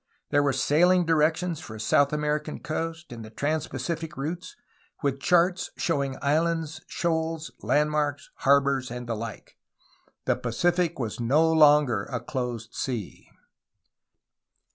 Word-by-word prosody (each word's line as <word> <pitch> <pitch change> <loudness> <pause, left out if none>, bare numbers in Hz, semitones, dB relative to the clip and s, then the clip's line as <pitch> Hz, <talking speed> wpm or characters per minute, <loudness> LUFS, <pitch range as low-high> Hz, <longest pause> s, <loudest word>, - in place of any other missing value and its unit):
There 145 -1 +4
were 145 -1 +2
sailing 170 +7 +3
directions 165 +1 +1
for 110 - -9
the - - -9
South 140 +6 +3
American 150 0 -1
coast 165 +1 -4
and 115 -2 -7
the 110 - -9
trans 145 +7 -1
Pacific 155 +3 -4
routes, 165 +6 -5 0.5
with 140 -1 0
charts 180 +4 +2
showing 140 -5 -1
islands, 160 +2 0
shoals, 160 -1 -2
landmarks, 150 -1 0
harbors, 140 -2 +3
and 125 +1 -6
the 115 - -2
like. 110 -1 -8 0.7
The - - +2
Pacific 170 +8 0
was 115 -4 -4
no 150 +8 +3
longer 145 -9 +5
a 125 - -4
closed 120 -2 -4
sea. 120 -7 -5
150 Hz, 130 wpm, -26 LUFS, 130-165 Hz, 0.7 s, longer